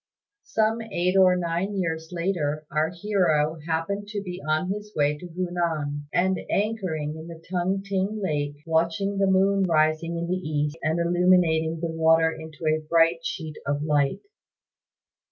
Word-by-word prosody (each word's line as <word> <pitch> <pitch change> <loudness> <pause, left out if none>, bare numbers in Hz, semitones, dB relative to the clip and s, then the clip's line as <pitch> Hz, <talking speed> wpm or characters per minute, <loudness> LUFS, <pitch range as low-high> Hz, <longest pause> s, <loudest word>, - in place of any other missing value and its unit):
Some 220 +1 +1
eight 185 -4 -1
or 185 -1 +6
nine 180 +3 -1
years 160 -3 -2
later 170 -4 -1
our 155 +2 +1
hero 170 -5 +1
happened 170 +6 -2
to 205 -1 -4
be 180 -1 -6
on 155 +4 0
his 210 +1 -5
way 145 0 +2
to 180 - -8
Hunan; 165 -5 -2
and 185 +1 +2
anchoring 185 -8 -1
in 160 +1 -9
the 165 -1 -9
Tung 190 +2 0
t'ing 200 +2 -1
lake, 145 -6 -1
watched 165 0 +1
the 195 0 0
moon 195 +1 +3
rising 160 0 +1
in 170 - -2
the 180 +2 -1
east 150 -3 -2
and 160 +2 0
illuminating 170 -2 +3
the 170 -1 -2
water 160 0 +4
into 160 0 -9
a 155 0 +2
bright 165 +1 +3
sheet 160 -4 -5
of 145 +1 0
light. 145 -2 +1
170 Hz, 155 wpm, -25 LUFS, 155-190 Hz, -, or